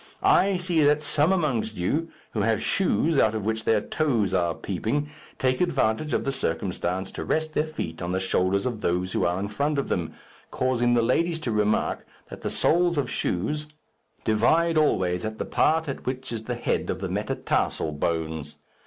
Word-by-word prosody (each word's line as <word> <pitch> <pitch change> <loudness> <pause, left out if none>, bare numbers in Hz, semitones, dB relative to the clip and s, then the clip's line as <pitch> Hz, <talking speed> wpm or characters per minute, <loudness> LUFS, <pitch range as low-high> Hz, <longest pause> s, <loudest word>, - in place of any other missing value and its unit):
I 195 0 +4
see 175 -2 +1
that 150 +1 +3
some 155 +4 +2
amongst 130 - 0
you, 150 - -1 0.2
who 110 - -1
have 110 +1 +2
shoes 165 -5 +2
out 110 0 +3
of 105 -2 -3
which 110 0 -1
their 110 -2 +3
toes 120 - 0
are 85 -3 +1
peeping, 120 +10 -2 0.3
take 130 -1 +1
advantage 145 -4 +1
of - - 0
the 135 - +1
circumstance 95 -4 -2
to - - -5
rest 155 0 -1
their 155 +1 +1
feet 80 - -5
on 85 +1 -2
the 95 - 0
shoulders 95 +1 +1
of 120 -4 -3
those 90 0 0
who - - +1
are 90 +2 0
in 100 - -2
front 145 +8 -1
of 140 - -1
them, 85 -3 -2 0.3
causing 120 -1 +1
the 120 - +3
ladies 165 +7 +1
to 125 - -2
remark 105 0 +1 0.3
that - - -8
the - - -2
soles 170 0 +2
of 145 - 0
shoes 150 +12 -1 0.6
divide 160 +10 +3
always 90 - +2
at 110 0 -4
the - - -3
part 160 0 +2
at 140 - -5
which 130 0 -3
is 110 -1 -5
the - - -2
head - - -1
of - - -2
the - - -3
metatarsal 75 - -1
bones. 80 -1 -3
115 Hz, 190 wpm, -25 LUFS, 95-150 Hz, 0.6 s, I